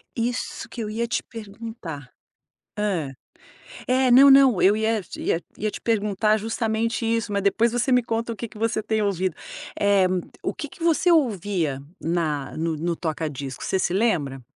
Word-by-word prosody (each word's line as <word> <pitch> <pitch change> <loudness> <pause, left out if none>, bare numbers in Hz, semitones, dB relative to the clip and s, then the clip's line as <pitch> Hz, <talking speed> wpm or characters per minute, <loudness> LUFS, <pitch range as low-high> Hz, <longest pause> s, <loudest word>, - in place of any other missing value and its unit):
Isso 245 +1 -3
que 235 - -6
eu 210 - -3
ia 235 +2 -2
te - - -1
perguntar. 205 - -8 0.7
Hã. 185 -9 -1 0.8
É, 255 0 +3
não, 275 +3 +9
não, 270 -7 +6
eu 200 +2 +5
ia 220 0 0
te - - -10
ia 165 - 0 0.2
ia 215 0 -1
te - - -7
perguntar 210 -1 +1
justamente 225 +1 -1
isso, 230 -1 0
mas 200 0 0
depois 225 +4 +2
você 245 +2 0
me 250 -1 +4
conta 230 0 -2
o - - -10
que 235 - -5
que 215 - -14
você 225 -1 -1
tem 220 -1 0
ouvido. 185 -4 0 0.4
Eh 200 -2 +4 0.4
o - - -1
que 295 - -6
que 330 +4 -11
você 340 +2 +3
ouvia 195 - 0 0.2
na 155 -4 -1
no 165 0 -1
no 170 +3 -1
toca 160 -2 -3
disco, 135 -2 -7
você 190 - 0
se 180 - 0
lembra? 150 - 0
210 Hz, 180 wpm, -24 LUFS, 175-230 Hz, 0.8 s, não